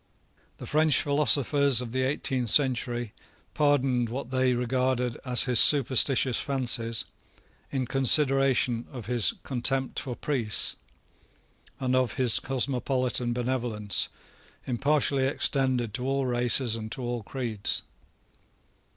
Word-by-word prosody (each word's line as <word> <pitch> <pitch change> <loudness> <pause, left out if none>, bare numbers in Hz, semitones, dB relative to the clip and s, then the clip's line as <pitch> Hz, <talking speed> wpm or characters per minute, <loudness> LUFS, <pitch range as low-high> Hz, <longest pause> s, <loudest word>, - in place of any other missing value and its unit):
The - - -10
French 155 -2 +2
philosophers 140 -2 +2
of 125 -2 -5
the 130 +2 -2
eighteenth 130 -2 -2
century 120 -3 +1 0.4
pardoned 135 -5 0
what 130 +1 -7
they 130 -1 +1
regarded 125 0 -2
as 125 -2 +1
his 125 -3 +3
superstitious 130 -2 +4
fancies 120 -4 0 0.6
in 130 -2 -3
consideration 135 -2 +2
of 125 -5 -9
his 120 -1 +1
contempt 130 +1 -1
for 125 -3 -6
priests, 120 -8 +1 1.0
and 130 -1 -1
of 130 -3 -1
his 125 -4 +3
cosmopolitan 130 -2 -2
benevolence, 120 -5 -2 0.6
impartially 135 +1 0
extended 130 -5 0
to 125 +2 -4
all 135 0 -1
races 120 -1 +2
and 110 -1 -7
to 130 - -7
all 120 -1 -4
creeds. 115 -3 -2
130 Hz, 115 wpm, -26 LUFS, 120-135 Hz, 1.0 s, superstitious